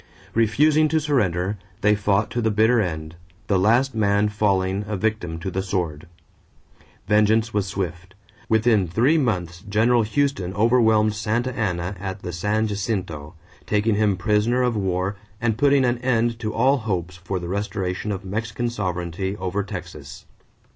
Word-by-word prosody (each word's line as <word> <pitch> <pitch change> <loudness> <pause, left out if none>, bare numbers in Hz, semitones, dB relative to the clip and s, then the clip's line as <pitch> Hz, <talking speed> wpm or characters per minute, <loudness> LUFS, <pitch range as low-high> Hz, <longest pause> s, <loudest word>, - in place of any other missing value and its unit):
Refusing 150 +8 +3
to 160 +1 +1
surrender, 100 - 0 0.2
they 105 +1 +4
fought 105 +1 +1
to 120 +1 -1
the 110 - +2
bitter 110 +2 +3
end, 80 -4 -4 0.3
the 95 -2 +1
last 120 +7 +3
man 105 -1 +2
falling 100 -2 0
a 105 - -2
victim 95 -5 -2
to 95 +3 -5
the 95 - -1
sword. 90 -6 -3 1.0
Vengeance 110 +2 +3
was 100 -1 0
swift. 95 -1 -5 0.3
Within 110 -3 +3
three 125 - +3
months 90 - -2
General 115 +3 +3
Houston 110 -5 -1
overwhelmed 110 -1 +3
Santa 115 +4 -1
Ana 90 -3 -2
at 95 0 -6
the 90 - -5
San 105 +6 0
Jacinto, 90 -7 -3 0.3
taking 105 +1 +1
him 105 -2 +2
prisoner 110 +5 +1
of 125 -2 +1
war 95 0 -1 0.2
and 115 -2 0
putting 140 +2 +3
an 120 0 0
end 120 -2 0
to 110 -2 -3
all 130 +6 +3
hopes 90 -7 -3
for 90 +2 -4
the 85 - -6
restoration 100 0 -3
of 95 -1 -5
Mexican 110 +4 -3
sovereignty 95 -1 -3
over 95 +1 -2
Texas. 85 -8 -8
105 Hz, 155 wpm, -23 LUFS, 95-115 Hz, 1.0 s, they